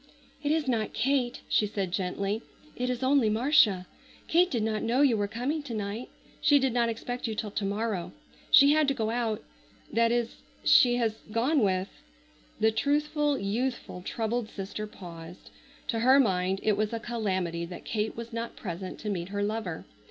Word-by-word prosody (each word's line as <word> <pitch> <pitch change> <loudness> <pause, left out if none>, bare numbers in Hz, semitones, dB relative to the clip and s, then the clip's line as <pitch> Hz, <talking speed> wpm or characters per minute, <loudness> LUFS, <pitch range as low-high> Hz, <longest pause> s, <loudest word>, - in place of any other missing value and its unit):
"It 295 0 0
is 310 -2 +1
not 225 -4 0
Kate," 250 0 0
she 210 - +2
said 200 -3 -3
gently; 195 +3 -1 0.3
"it 250 0 -2
is 250 0 -2
only 260 -4 +4
Marcia. 215 -5 +4 0.4
Kate 355 +2 +4
did 235 -8 -1
not 215 -1 -1
know 245 +5 +2
you 260 -5 +4
were 205 -1 0
coming 250 +9 -2
to 265 -6 -6
night. 210 +3 -4 0.3
She 290 - +6
did 265 -3 +1
not 235 -1 +2
expect 245 +2 -4
you 220 - -3
till 210 -1 -3
to 200 - -2
morrow. 200 -3 -2 0.4
She 280 0 +8
had 305 -1 +3
to 275 - +1
go 220 -3 -1
out,—that 225 - -2
is—she 240 +1 +3
has 225 -2 0
gone 255 +8 +2
with—" 190 -3 +1 0.7
the 220 - +4
truthful, 295 +3 +1
youthful, 225 -2 -2
troubled 225 +3 -2
sister 205 +2 -5
paused. 175 -4 -11 0.4
To 230 - 0
her 260 +4 +6
mind 190 -5 +1
it 215 -2 +3
was 215 +2 -1
a 230 - -2
calamity 190 -8 -2
that 175 +1 -9
Kate 215 0 -2
was 235 0 -7
not 230 0 -4
present 185 -1 -6
to 215 - -3
meet 175 -2 -3
her 205 0 -2
lover. 205 -5 -3
225 Hz, 175 wpm, -28 LUFS, 200-250 Hz, 0.7 s, She